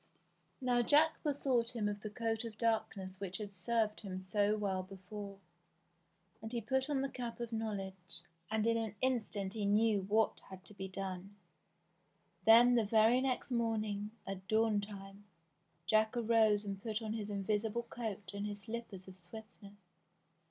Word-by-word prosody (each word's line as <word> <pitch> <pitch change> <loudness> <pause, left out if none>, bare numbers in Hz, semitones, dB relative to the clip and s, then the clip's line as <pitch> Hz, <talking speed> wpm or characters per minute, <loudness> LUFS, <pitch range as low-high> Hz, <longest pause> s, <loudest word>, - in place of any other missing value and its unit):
Now 250 -2 +2
Jack 305 +6 +4
bethought 255 -5 +1
him 215 -3 0
of 205 0 -3
the 215 - -4
coat 225 +1 -1
of 225 -2 -7
darkness 200 -5 -1
which 195 -2 -3
had 205 -2 -6
served 215 +3 0
him 185 -3 -5
so 205 +2 +2
well 195 -3 0
before, 195 +2 -8 1.0
and 220 0 -6
he 240 - -1
put 265 +5 0
on 280 -2 +1
the 275 - 0
cap 245 -3 -5
of 235 -1 -4
knowledge, 195 -6 -4 0.3
and 220 0 +1
in 230 0 +3
an 220 -3 -2
instant 215 -6 0
he 215 - -3
knew 210 0 +4
what 215 +3 +2
had 185 -2 -10
to 185 - -13
be 190 -1 -5
done. 190 +1 -5 1.1
Then 235 +2 +9
the 235 -2 +4
very 225 +4 +5
next 260 0 -1
morning, 215 -3 0 0.2
at 190 -1 -6
dawn 220 -1 +3
time. 200 0 -9 0.6
Jack 220 +5 +3
arose 220 -3 +4
and 195 -1 -4
put 220 +1 -2
on 215 0 -2
his 215 -2 -4
invisible 210 +3 0
coat 220 -4 -5
and 200 +1 -3
his 205 0 -6
slippers 220 -4 -6
of 190 0 -12
swiftness. 200 0 -13
215 Hz, 165 wpm, -35 LUFS, 195-230 Hz, 1.1 s, Then